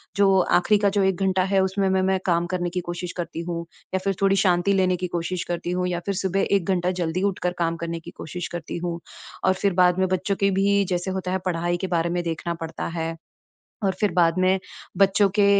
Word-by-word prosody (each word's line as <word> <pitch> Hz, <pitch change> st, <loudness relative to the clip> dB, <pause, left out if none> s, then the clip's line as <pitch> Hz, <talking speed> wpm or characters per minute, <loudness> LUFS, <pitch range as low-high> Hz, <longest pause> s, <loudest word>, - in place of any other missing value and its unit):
जो 195 Hz, -1 st, +4 dB
आखिरी 180 Hz, +4 st, +3 dB
का 200 Hz, -1 st, +3 dB
जो 200 Hz, 0 st, +1 dB
1 190 Hz, -1 st, +1 dB
घंटा 190 Hz, -1 st, +2 dB
है, 195 Hz, +1 st, +2 dB
उसमें 190 Hz, +1 st, 0 dB
मैं 190 Hz, 0 st, +2 dB
मैं 190 Hz, 0 st, +2 dB
काम 170 Hz, -1 st, +2 dB
करने 175 Hz, -1 st, -1 dB
की 180 Hz, +1 st, -2 dB
कोशिश 175 Hz, 0 st, -4 dB
करती 170 Hz, -1 st, -4 dB
हूँ, 170 Hz, 0 st, -3 dB, 0.3 s
या 190 Hz, -, +2 dB
फिर 195 Hz, -, +1 dB
थोड़ी 195 Hz, 0 st, +4 dB
शांति 180 Hz, +2 st, +3 dB
लेने 185 Hz, -1 st, +3 dB
की 180 Hz, +1 st, -3 dB
कोशिश 170 Hz, +1 st, -2 dB
करती 175 Hz, 0 st, -2 dB
हूँ, 180 Hz, 0 st, 0 dB
या 175 Hz, -1 st, -1 dB
फिर 200 Hz, -, -1 dB
सुबह 190 Hz, 0 st, 0 dB
1 190 Hz, -, +1 dB
घंटा 180 Hz, -1 st, +1 dB
जल्दी 170 Hz, +3 st, -1 dB
उठकर 180 Hz, -2 st, -2 dB
काम 165 Hz, -1 st, +1 dB
करने 170 Hz, 0 st, -3 dB
की -, -, -11 dB
कोशिश 175 Hz, +3 st, -5 dB
करती 170 Hz, -1 st, -5 dB
हूँ। 170 Hz, -1 st, -3 dB, 0.5 s
और 190 Hz, -, +5 dB
फिर 195 Hz, +1 st, 0 dB
बाद 180 Hz, 0 st, +4 dB
में 190 Hz, -, +3 dB
बच्चों 185 Hz, +2 st, 0 dB
के 200 Hz, 0 st, +2 dB
भी 200 Hz, +1 st, +3 dB
जैसे 180 Hz, +1 st, -1 dB
होता 185 Hz, -1 st, -3 dB
है 190 Hz, -, +1 dB
पढ़ाई 175 Hz, -1 st, 0 dB
के 190 Hz, -, -3 dB
बारे 170 Hz, -1 st, 0 dB
में 175 Hz, 0 st, -1 dB
देखना 170 Hz, 0 st, -3 dB
पड़ता 160 Hz, -, -5 dB
है। 165 Hz, 0 st, -2 dB, 0.7 s
और 195 Hz, -, +2 dB
फिर 210 Hz, -2 st, +3 dB
बाद 170 Hz, -2 st, +4 dB
में 185 Hz, +1 st, +3 dB, 0.4 s
बच्चों 195 Hz, +1 st, +4 dB
के 205 Hz, -, +6 dB
185 Hz, 235 wpm, -24 LUFS, 175-190 Hz, 0.7 s, के